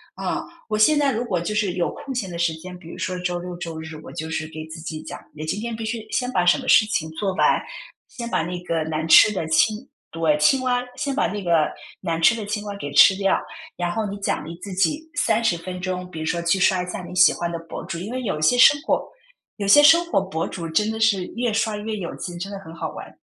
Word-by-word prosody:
啊。 -, -, -3 dB, 0.2 s
我 215 Hz, -, -1 dB
现 295 Hz, +8 st, +5 dB
在 280 Hz, -2 st, +2 dB
如 230 Hz, -, -1 dB
果 200 Hz, -8 st, -1 dB
就 195 Hz, +5 st, -3 dB
是 205 Hz, -4 st, +1 dB
有 175 Hz, -1 st, 0 dB
空 270 Hz, -, -7 dB
闲 230 Hz, -7 st, -3 dB
的 170 Hz, -, -6 dB
时 170 Hz, -1 st, +1 dB
间， 180 Hz, +3 st, -9 dB
比 170 Hz, -2 st, -13 dB
如 -, -, -9 dB
说 185 Hz, 0 st, -3 dB
周 180 Hz, -1 st, -2 dB
六 180 Hz, 0 st, -6 dB
周 165 Hz, -2 st, -6 dB
日， 160 Hz, 0 st, -8 dB
我 -, -, -10 dB
就 160 Hz, +1 st, -5 dB
是 160 Hz, 0 st, -3 dB
给 155 Hz, 0 st, -7 dB
自 160 Hz, +1 st, -9 dB
己 155 Hz, -1 st, -6 dB
讲， -, -, -8 dB, 0.2 s
你 155 Hz, 0 st, -7 dB
今 165 Hz, +7 st, -2 dB
天 235 Hz, 0 st, -4 dB
必 225 Hz, -, -5 dB
须 220 Hz, 0 st, -4 dB
先 250 Hz, -1 st, 0 dB
把 180 Hz, -1 st, +2 dB
什 175 Hz, -, +5 dB
么 -, -, -8 dB
事 215 Hz, -, +6 dB
情 160 Hz, -7 st, -1 dB
做 190 Hz, +4 st, -2 dB
完， -, -, +3 dB, 0.5 s
先 235 Hz, -1 st, -6 dB
把 -, -, +1 dB
那 175 Hz, +1 st, -4 dB
个 165 Hz, -2 st, -1 dB
难 160 Hz, 0 st, -2 dB
吃 165 Hz, -, +8 dB
的 185 Hz, -6 st, -3 dB
青 215 Hz, +9 st, +2 dB, 0.2 s
对， 160 Hz, -2 st, +1 dB
青 260 Hz, -, +4 dB
蛙， 250 Hz, -1 st, +1 dB
先 280 Hz, 0 st, -2 dB
把 280 Hz, -, +1 dB
那 205 Hz, -1 st, -5 dB
个 165 Hz, -4 st, +3 dB, 0.3 s
难 165 Hz, -3 st, -2 dB
吃 165 Hz, +8 st, +6 dB
的 225 Hz, -, -5 dB
青 210 Hz, 0 st, -3 dB
蛙 205 Hz, -1 st, -5 dB
给 145 Hz, -, -5 dB
吃 190 Hz, +6 st, +8 dB
掉， 195 Hz, 0 st, +2 dB, 0.4 s
然 175 Hz, -1 st, -1 dB
后 215 Hz, +3 st, -2 dB
你 200 Hz, -, -5 dB
奖 200 Hz, -6 st, -2 dB
励 165 Hz, +2 st, -8 dB
自 200 Hz, -, -7 dB
己 185 Hz, -, +1 dB
30 230 Hz, -, +2 dB
分 180 Hz, +2 st, -7 dB
钟， 180 Hz, 0 st, -4 dB
比 165 Hz, -, -10 dB
如 160 Hz, -, -3 dB
说 170 Hz, +2 st, -1 dB
去 170 Hz, +3 st, +2 dB
刷 185 Hz, -1 st, +3 dB
一 -, -, -3 dB
下 180 Hz, -, -5 dB
你 175 Hz, -, -9 dB
喜 180 Hz, 0 st, +6 dB
欢 170 Hz, 0 st, -3 dB
的 170 Hz, -, -4 dB
博 -, -, -6 dB
主， 170 Hz, -2 st, -5 dB
因 195 Hz, +6 st, -6 dB
为 255 Hz, 0 st, -3 dB
有 200 Hz, -, -2 dB
一 -, -, -6 dB
些 200 Hz, +11 st, +4 dB
生 290 Hz, +4 st, +7 dB
活 325 Hz, -, 0 dB, 0.5 s
有 200 Hz, -2 st, -3 dB
些 290 Hz, +9 st, +8 dB
生 330 Hz, +3 st, +7 dB
活 340 Hz, -, +2 dB
博 190 Hz, -4 st, -3 dB
主 170 Hz, -2 st, -6 dB
真 210 Hz, +7 st, +1 dB
的 220 Hz, 0 st, -3 dB
是 205 Hz, -5 st, +2 dB
越 235 Hz, -1 st, 0 dB
刷 220 Hz, -1 st, 0 dB
越 215 Hz, +1 st, -4 dB
有 175 Hz, -4 st, -5 dB
劲， 175 Hz, -1 st, -7 dB
真 195 Hz, +3 st, -5 dB
的 200 Hz, -, -5 dB
很 165 Hz, -4 st, -11 dB
好 165 Hz, -, -4 dB
玩。 -, -, -10 dB
185 Hz, 290 characters per minute, -23 LUFS, 165-220 Hz, 0.5 s, 吃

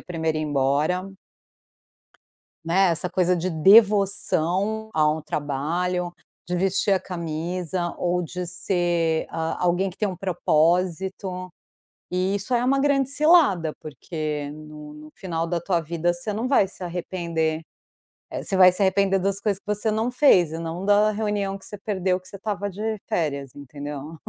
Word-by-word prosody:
a -, -, -15 dB
1ª 160 Hz, -3 st, -2 dB
a -, -, -1 dB
ir -, -, -2 dB
embora. 150 Hz, +7 st, 0 dB, 1.5 s
Né, 185 Hz, +3 st, +3 dB
essa 170 Hz, +2 st, -1 dB
coisa 180 Hz, -1 st, +2 dB
de 180 Hz, +2 st, -2 dB
devoção 200 Hz, +2 st, +3 dB
ao 155 Hz, 0 st, +2 dB
trabalho, 170 Hz, +5 st, -2 dB, 0.3 s
de 180 Hz, -, -1 dB
vestir 195 Hz, +2 st, +1 dB
a 190 Hz, -, +3 dB
camisa, 175 Hz, +1 st, -3 dB
ou 180 Hz, 0 st, 0 dB
de 180 Hz, +1 st, -5 dB
ser 175 Hz, -2 st, 0 dB
a 160 Hz, +1 st, -3 dB
alguém 180 Hz, +2 st, +1 dB
que 180 Hz, -, -17 dB
tem 210 Hz, -, 0 dB
um 185 Hz, -, -5 dB
propósito. 185 Hz, +2 st, 0 dB, 0.6 s
E 185 Hz, +2 st, +1 dB
isso 205 Hz, +5 st, -2 dB
é 240 Hz, 0 st, +2 dB
uma 270 Hz, +2 st, +2 dB
grande 275 Hz, -2 st, +2 dB
cilada 285 Hz, -, +4 dB
porque 150 Hz, -1 st, -5 dB
no 150 Hz, 0 st, -11 dB
no 155 Hz, 0 st, -12 dB
final 165 Hz, -3 st, -3 dB
da 170 Hz, 0 st, -1 dB
tua 175 Hz, -1 st, 0 dB
vida 170 Hz, +2 st, -1 dB
você 175 Hz, +5 st, -4 dB
não 220 Hz, +4 st, -2 dB
vai 255 Hz, -7 st, +3 dB
se 185 Hz, -, -8 dB
arrepender, 170 Hz, -2 st, -2 dB, 0.7 s
eh, -, -, -5 dB
você 195 Hz, -, 0 dB
vai 185 Hz, -1 st, +8 dB
se 190 Hz, +3 st, +1 dB
arrepender 195 Hz, 0 st, +2 dB
das 195 Hz, +1 st, -1 dB
coisas 200 Hz, -2 st, -1 dB
que -, -, -54 dB
você 210 Hz, +2 st, -1 dB
não 220 Hz, +3 st, 0 dB
fez 190 Hz, -, +4 dB
e 160 Hz, -, -5 dB
não 165 Hz, +3 st, -5 dB
da 205 Hz, +1 st, +4 dB
reunião 205 Hz, -2 st, -2 dB
que 195 Hz, -, -12 dB
você -, -, -7 dB
perdeu 190 Hz, -2 st, -1 dB
que 185 Hz, -, -15 dB
você -, -, -9 dB
estava 205 Hz, 0 st, -3 dB
de 215 Hz, +3 st, -3 dB
férias, 140 Hz, -5 st, -2 dB
entendeu. 145 Hz, +2 st, -8 dB
180 Hz, 165 wpm, -24 LUFS, 160-195 Hz, 1.5 s, vai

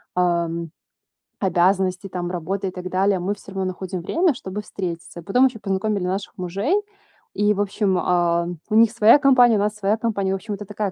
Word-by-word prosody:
эм, 170 Hz, -2 st, 0 dB, 0.7 s
обязанности, 185 Hz, 0 st, +1 dB
там 175 Hz, -1 st, -4 dB
работы 190 Hz, +3 st, -3 dB
и -, -, -3 dB
так 180 Hz, 0 st, -7 dB
далее. 195 Hz, +1 st, +2 dB
Мы 190 Hz, +4 st, -1 dB
всё 200 Hz, -1 st, -13 dB
равно 190 Hz, -1 st, -2 dB
находим 185 Hz, -1 st, -4 dB
время, 330 Hz, -, +1 dB
чтобы 200 Hz, -2 st, -6 dB
встретиться. 170 Hz, -4 st, -6 dB
И -, -, -17 dB
потом 250 Hz, +8 st, +3 dB
ещё 245 Hz, -4 st, -7 dB
познакомили 195 Hz, -1 st, -1 dB
наших 195 Hz, +2 st, -4 dB
мужей, 195 Hz, -, -1 dB, 0.6 s
и, 210 Hz, 0 st, +3 dB
в -, -, -5 dB
общем, 200 Hz, -1 st, 0 dB
а, 170 Hz, -1 st, +1 dB, 0.2 s
у 215 Hz, -, 0 dB
них 225 Hz, 0 st, +6 dB
своя 230 Hz, +3 st, +6 dB
компания, 250 Hz, -5 st, +5 dB
у -, -, 0 dB
нас 210 Hz, +1 st, 0 dB
своя 210 Hz, +1 st, 0 dB
компания. 200 Hz, -4 st, -1 dB
В -, -, +1 dB
общем 205 Hz, +2 st, -6 dB
это 205 Hz, +1 st, -8 dB
такая 210 Hz, 0 st, -3 dB
195 Hz, 200 wpm, -22 LUFS, 180-210 Hz, 0.7 s, них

